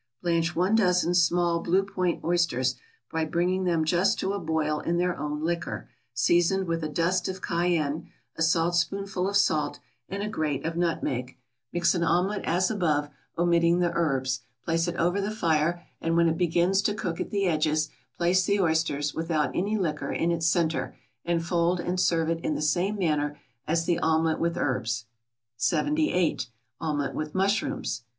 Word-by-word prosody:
= 120 - -53
Blanch 170 -1 +1
one 185 +5 +2
dozen 180 -5 +3
small 175 -1 +3
Blue 185 +3 +2
Point 185 -3 -2
oysters, 165 -7 +1 0.4
by 160 0 0
bringing 180 +4 0
them 165 -3 +1
just 185 +6 +2
to 195 - -1
a 200 - -2
boil 155 -3 -1
in 170 +2 -1
their 180 0 +1
own 150 +1 -4
liquor, 170 -5 -3 0.2
seasoned 175 +10 +2
with 165 -1 -2
a 155 - -2
dust 175 +3 0
of 190 0 -6
cayenne, 170 -3 0 0.3
a - - -7
saltspoonful 175 +4 +1
of 200 - +2
salt, 150 -7 +1 0.3
and 200 +1 -3
a - - -2
grate 155 -9 -2
of 165 0 -2
nutmeg; 135 -7 -2 0.3
mix 175 0 +2
an 175 - -1
omelette 180 +5 +1
as 180 +4 +1
above, 155 -8 0 0.3
omitting 170 0 +3
the 175 -1 +1
herbs, 135 -6 0 0.3
place 165 +1 +1
it 175 - -2
over 175 +4 +1
the 200 - -1
fire, 170 -4 0 0.2
and 165 0 0
when 170 0 +5
it 160 - +1
begins 175 +2 +2
to 205 +1 0
cook 175 -6 -3
at - - -3
the 200 -1 0
edges, 155 -2 +1 0.3
place 180 +2 +3
the 200 +2 +1
oysters, 160 -4 +1
without 155 -5 -1
any 205 +4 0
liquor, 155 -6 -2
in 170 - 0
its 165 -1 0
centre, 165 -1 0 0.3
and 170 -1 0
fold 175 +1 +1
and 180 +1 -2
serve 165 -3 +2
it 165 0 0
in 155 - 0
the 145 - -3
same 180 +7 +1
manner 150 -5 0 0.3
as 165 +1 +1
the 170 -1 +1
omelette 160 0 +1
with 170 0 0
herbs. 120 -3 -1 0.5
78. 185 - +1 0.3
=Omelette 150 -3 -2
with 155 +1 -4
Mushrooms. 195 -8 0
170 Hz, 175 wpm, -27 LUFS, 155-180 Hz, 0.5 s, when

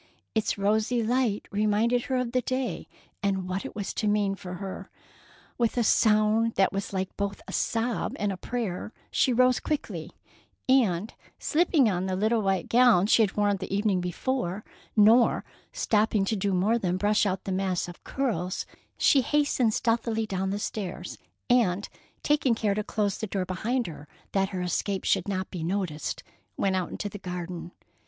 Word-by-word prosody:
Its 220 -1 0
rosy 215 +4 +1
light 235 -2 0
reminded 215 +4 +2
her 265 - -1
of 250 -2 -1
the 255 0 +1
day, 255 +1 -3 0.3
and 195 -3 0
what 185 +1 -2
it - - -8
was 205 -1 -3
to 215 - -1
mean 205 -1 +2
for 180 -2 -7
her. 195 +1 -7 0.7
With 235 0 +1
a 240 - +3
sound 215 +1 +3
that 195 0 +3
was 195 +1 -3
like 190 -1 -3
both 200 0 -2
a - - -6
sob 230 +1 -1
and 205 -1 0
a - - -3
prayer, 215 0 -4 0.2
she 260 - +3
rose 255 +1 +4
quickly, 300 -1 -3 0.6
and, 220 -7 +2 0.2
slipping 315 -5 +3
on 185 -2 0
the 185 - -1
little 220 +4 +2
white 195 -2 0
gown 235 -6 +5
she 225 - +5
had 205 -2 +1
worn 205 -1 +2
the 190 0 -7
evening 200 -2 +1
before, 185 +2 -2 0.3
nor 225 +3 +5 0.3
stopping 210 -2 +1
to 220 - 0
do 200 0 0
more 200 +6 +2
than 180 -3 0
brush 205 +2 +2
out 190 -1 -2
the 195 - -4
mass 185 -2 0
of 175 - -11
curls, 200 -9 -2 0.3
she 275 - +5
hastened 275 -3 +2
stealthily 230 -1 0
down 190 -2 -2
the 200 - -1
stairs 205 -3 -5 0.3
and, 210 -6 +2 0.3
taking 290 -5 +2
care 215 -2 +1
to 210 +1 -2
close 205 -2 -1
the 220 - -3
door 190 -1 -2
behind 230 +8 -1
her 150 -4 -8 0.2
that 195 -1 +1
her 185 -2 -3
escape 190 +2 -1
should 195 -1 +1
not 190 -2 -3
be 175 -4 -4
noticed, 175 -4 -2 0.3
went 195 -1 +1
out 185 -2 -1
into 210 - -4
the 205 0 -8
garden. 180 -1 -6
205 Hz, 175 wpm, -27 LUFS, 190-230 Hz, 0.7 s, gown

